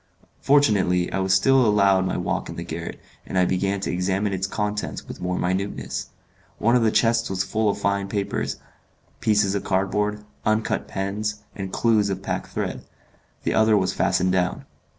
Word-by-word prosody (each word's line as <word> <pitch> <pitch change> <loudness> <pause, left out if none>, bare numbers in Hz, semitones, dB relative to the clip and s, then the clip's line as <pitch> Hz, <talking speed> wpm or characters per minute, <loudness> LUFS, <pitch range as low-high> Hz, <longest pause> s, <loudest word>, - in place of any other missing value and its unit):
Fortunately, 100 -11 +3
I - - 0
was 95 0 0
still 130 +8 +5
allowed 100 -3 +4
my - - -1
walk - - -2
in - - -6
the 85 - -5
garret, 85 0 -6 0.2
and - - -4
I 90 - +4
began 95 +2 0
to - - -2
examine 95 +3 0
its 95 +1 -1
contents 105 0 -3
with - - -8
more 90 0 -1
minuteness. 95 +3 -2 0.5
One 115 +3 +3
of 125 - +4
the 115 - +4
chests 115 +1 +2
was 95 0 0
full 110 +2 0
of 100 - -1
fine 100 -1 0
paper, 100 -1 -1 0.8
pieces 105 -3 +2
of 100 -1 -2
cardboard, 105 +2 0 0.2
uncut 110 0 0
pens, 105 +2 -3
and 95 -2 -5
clews 110 -3 +2
of 95 0 -3
pack - - -3
thread; - - -4 0.6
the - - 0
other 110 -1 +4
was 95 -2 +1
fastened 95 0 +1
down. 90 -1 0
100 Hz, 175 wpm, -24 LUFS, 95-105 Hz, 0.8 s, still